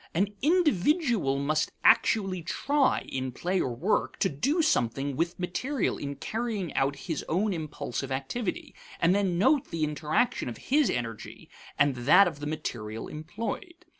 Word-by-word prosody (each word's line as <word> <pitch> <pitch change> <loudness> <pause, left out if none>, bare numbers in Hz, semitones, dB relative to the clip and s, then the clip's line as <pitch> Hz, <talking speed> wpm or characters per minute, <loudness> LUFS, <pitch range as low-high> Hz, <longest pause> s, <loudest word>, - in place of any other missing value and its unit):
An 195 +4 +2
individual 295 - +2
must 150 +2 0
actually 195 -5 +4
try, 270 - +1
in 130 -1 -3
play 180 +8 -1
or 125 - -1
work, 185 - 0
to 190 - +3
do 280 - +1
something 135 - +1
with 170 +4 -1
material 250 +11 -1
in 140 0 -4
carrying 215 - -3
out 135 +1 +1
his 160 -6 -3
own 195 +5 +1
impulsive 150 -5 -4
activity, 140 - -3 0.3
and 170 +2 +4
then 190 -3 +1
note 260 - +3
the 165 -2 -2
interaction 155 - 0
of 115 - -7
his 290 0 +2
energy 115 -3 -5 0.3
and 145 -2 +3
that 155 +11 +6
of 160 -4 -5
the 145 - -4
material 115 -8 -4
employed. 220 - -6
170 Hz, 150 wpm, -28 LUFS, 140-225 Hz, 0.3 s, that